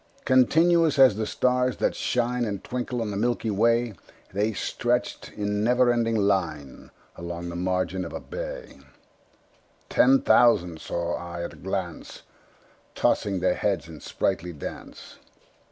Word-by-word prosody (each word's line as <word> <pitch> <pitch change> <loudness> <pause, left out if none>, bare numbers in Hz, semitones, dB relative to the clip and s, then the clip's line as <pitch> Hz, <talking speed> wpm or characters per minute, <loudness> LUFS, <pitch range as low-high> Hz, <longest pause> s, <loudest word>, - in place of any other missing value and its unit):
Continuous 160 +5 +4
as 130 -6 +7
the 110 0 -2
stars 125 +1 +1
that - - +1
shine 125 0 -1
And 100 -4 -4
twinkle 125 -2 -3
on 105 - -4
the 100 - -3
milky 115 0 0
way, 115 +2 +2 0.4
The 105 +3 +1
stretched 120 +4 -2
in 105 0 -2
never 125 +1 +3
ending 115 -1 0
line 95 -10 -1 0.3
Along 85 0 -6
the 85 - -6
margin 90 0 -1
of 85 - -7
a - - -5
bay: - - -7 1.1
Ten 270 0 +4
thousand 90 - +4
saw 85 0 -3
I 85 0 -6
at - - -6
a - - -14
glance, 95 -3 -5 0.7
Tossing 95 -3 +1
their - - +2
heads - - -1
in 80 -2 -10
sprightly 90 +4 -2
dance. 75 - -9
105 Hz, 140 wpm, -25 LUFS, 90-125 Hz, 1.1 s, as